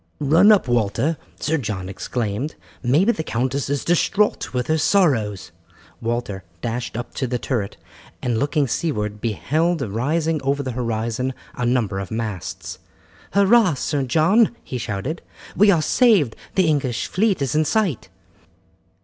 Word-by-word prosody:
"Run 160 +9 +5
up, 205 -10 +4
Walter," 120 +6 +1 0.2
Sir 160 +1 0
John 105 -7 -4
exclaimed, 110 +7 -3 0.3
"maybe 150 - +3
the 160 - -3
countess 130 0 -2
is 145 -1 -1
distraught 195 +4 +1
with 125 -1 -1
her 160 0 +1
sorrows." 130 - +2 0.5
Walter 115 -5 -3 0.2
dashed 120 -1 -3
up 120 - -6
to 130 - -2
the 125 0 -1
turret, 115 -5 -3 0.4
and 120 -3 -1
looking 145 0 +1
seaward 105 -7 -2
beheld 155 - 0
rising 150 +9 -1
over 140 +1 0
the 130 - -3
horizon 115 +1 -2 0.2
a 125 - -2
number 110 -6 0
of 95 - -5
masts. 110 -5 -5 0.5
"Hurrah! 200 -3 +5
Sir 145 +2 -1
John," 165 - +3
he 125 - -5
shouted, 115 - -4 0.3
"we 210 +2 +5
are 170 -5 +4
saved, 200 - +3 0.2
the 190 - +4
English 140 -7 0
fleet 200 -1 +1
is 140 -3 -1
in 155 +1 +3
sight." 175 - 0
135 Hz, 145 wpm, -22 LUFS, 115-160 Hz, 0.5 s, Run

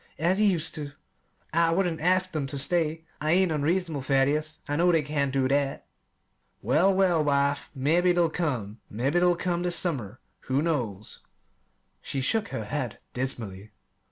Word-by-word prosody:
as 175 +6 +1
he 210 - +4
used 165 -2 0
to. 145 -2 -6 0.6
I 165 0 +3
wouldn't 170 -2 0
ask 185 +1 +1
'em 145 -3 -1
ter 140 - -4
stay 160 +2 0 0.2
I 155 +2 +2
ain't 185 -1 +3
unreasonable, 160 0 0
Thaddeus. 145 +3 +1
I 145 - -1
know 175 +3 +3
they 165 -3 +2
can't 145 -2 -1
do 130 -1 +1
that." 140 0 0 0.8
"Well, 155 - +3
well, 185 -4 +2
wife, 140 0 +1
mebbe 155 +7 +1
they'll 175 -1 +3
come 125 - -3
mebbe 125 +7 -1
they'll 175 0 +3
come 175 0 -2
this 175 -1 +3
summer; 130 - -1 0.3
who 135 +3 0
knows?" 115 - -3 0.8
She 135 - -4
shook 215 +11 0
her 110 - -5
head 130 -2 -3 0.2
dismally. 110 -6 -3
150 Hz, 160 wpm, -27 LUFS, 135-175 Hz, 0.8 s, he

